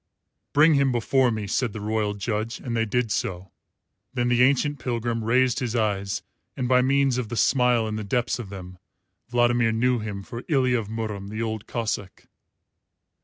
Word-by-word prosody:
"Bring 155 +2 +6
him 140 -2 +3
before 125 +2 +2
me," 110 -3 -2
said 115 +3 -1
the 110 - -5
royal 105 0 -1
judge, 110 +3 -3
and 120 -3 -4
they 115 0 +1
did 115 +1 -1
so. 95 -2 -3 0.6
Then 120 -1 +1
the 120 0 +3
ancient 140 +3 +3
pilgrim 115 -2 -2
raised 125 +3 +2
his 125 -3 -2
eyes, 100 -3 -1 0.3
and 125 - -1
by 125 0 +4
means 135 -1 +2
of 115 -4 -4
the 120 - -4
smile 125 -3 +3
in 110 0 -3
the 110 - -4
depths 120 +4 -1
of 110 -5 -6
them 90 -2 -9 0.5
Vladimir 120 -1 +3
knew 125 +2 +1
him 105 -2 -5
for 115 +4 -8
Ilya 130 -5 +2
of 110 - -6
Murom 110 -3 -4
the 110 +2 -3
Old 110 -2 -4
Cossáck. 110 -5 -4
115 Hz, 180 wpm, -25 LUFS, 105-125 Hz, 0.6 s, Bring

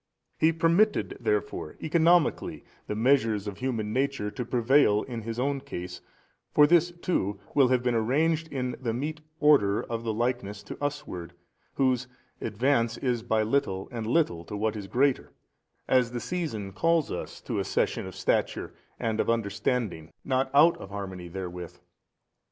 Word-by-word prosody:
He 160 +1 +5
permitted 170 +6 +2
therefore 420 0 -2
economically 165 +1 +2 0.2
the 105 - -2
measures 115 -3 +2
of 100 -1 -6
human 115 -5 -2
nature 135 -6 0
to 125 - -4
prevail 120 -2 +3
in 120 -3 -6
His 115 +1 -5
own 140 +2 0
case, 90 -10 -7 0.5
for 150 - +7
this 170 +2 +4
too 170 - -2
will 140 -3 +5
have 125 -1 +2
been 125 -1 +1
arranged 150 +8 +1
in 130 -4 -3
the 115 -3 -1
meet 155 +5 -3 0.2
order 135 -10 +4
of 115 -1 -4
the 115 - -1
likeness 110 -3 -2
to - - -8
usward, 115 -12 -4 0.4
whose 130 -2 +1 0.3
advance 115 0 +1
is 125 -3 -1
by 110 -2 +1
little 105 -5 0
and 115 -3 -4
little 115 - +1
to 105 - -5
what 110 +1 0
is 100 -2 -6
greater, 130 +6 +1 0.5
as 125 -2 +3
the 120 - -2
season 115 - -4
calls 165 - +2
us - - -5
to - - -3
accession - - 0
of - - -9
stature - - 0 0.3
and 110 -1 -1
of - - +1
understanding 105 -5 -1
not 130 0 +1
out 155 +4 +6
of 95 - -9
harmony 95 -3 -6
therewith. 90 -1 -7
120 Hz, 155 wpm, -28 LUFS, 105-145 Hz, 0.5 s, for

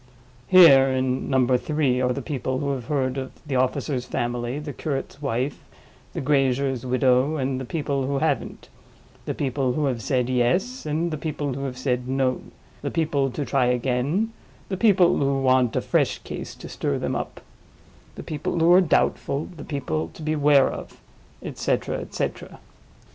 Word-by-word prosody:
Here, 140 -6 +8
in 130 0 -1
Number 130 -2 +3
Three, 140 -4 0
are 125 0 +2
the 135 +1 -3
people 130 -2 -2
who 140 +1 -1
have 130 -4 -4
heard 135 -1 -1
of 130 0 -6
the 140 -3 -3
officer's 130 +1 0
family, 120 +2 -2
the 150 -1 -6
curate's 140 -1 -4
wife, 135 0 -2 0.5
the - - -3
grazier's 135 -2 +1
widow, 130 +3 +2
and 130 -1 -1
the - - -5
people 140 -2 -2
who 140 0 0
haven't; 150 -1 -2 0.6
the - - -3
people 130 -2 -1
who 150 +1 0
have 125 -4 -1
said 125 0 0
Yes, 155 - 0
and 160 +3 -1
the 155 - -4
people 145 -3 -3
who 135 +2 -4
have 130 -2 -5
said 125 -1 -1
No; 130 -1 0 0.4
the - - -2
people 150 -5 0
to 140 +3 -4
try 130 +1 +2
again, 130 - 0 0.4
the 190 - -1
people 185 -4 +4
who 140 -1 +1
want 130 -3 +3
a - - +1
fresh - - +1
case - - -7
to - - -10
stir - - -2
them - - -2
up, - - -5 0.8
the - - -8
people 155 +2 -3
who 165 +2 +5
are 185 - +7
doubtful, 150 -3 0
the 150 - -9
people 80 - -3
to 160 - -9
beware 150 -3 +4
of; - - -9 0.4
et - - -7
cetera, - - -1
et - - -9
cetera. - - -4
135 Hz, 175 wpm, -24 LUFS, 130-150 Hz, 0.8 s, Here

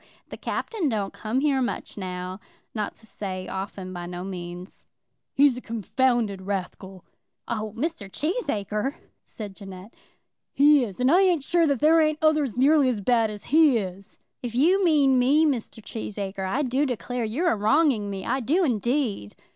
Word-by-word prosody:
The - - -8
Captain 390 -10 -2
don't 205 -4 -2
come 230 +5 -2
here 280 -3 +2
much 245 - -3
now; 185 -1 -5 0.3
not 210 -2 -3
to 225 - -12
say 185 -4 -6
often, 190 -1 -6
by 175 -1 -6
no 175 0 -6
means." 180 -1 -8 0.5
"He's 275 -3 +4
a - - -6
confounded 230 -2 0
rascal." 190 -1 -5 0.4
"Oh, 215 -2 -3
Mr. 280 - -3
Cheesacre!" 270 - -2 0.3
said 205 -3 -8
Jeannette. 195 +2 -11 0.6
"He 290 -1 +5
is; 200 -6 -6
and 255 +2 +3
I 360 +3 +6
ain't 355 -7 +3
sure 335 +3 +2
that 280 -4 0
there 320 +2 +5
ain't 310 -1 +2
others 305 -6 +2
nearly 280 +1 +4
as 235 -4 -1
bad 225 +1 +2
as 210 -1 -8
he 300 -3 +4
is." 195 -1 -6 0.2
"If 240 -2 -5
you 360 +9 +4
mean 285 -6 +4
me, 285 +6 +4
Mr. 240 -6 -2
Cheesacre, 200 -3 -5
I 270 +9 0
do 270 +3 +1
declare 245 0 -3
you're 260 +11 0
a - - +1
wronging 220 0 +2
me; 195 -1 -5
I 260 +3 0
do 305 - +1
indeed." 235 - -1
235 Hz, 170 wpm, -25 LUFS, 200-290 Hz, 0.6 s, I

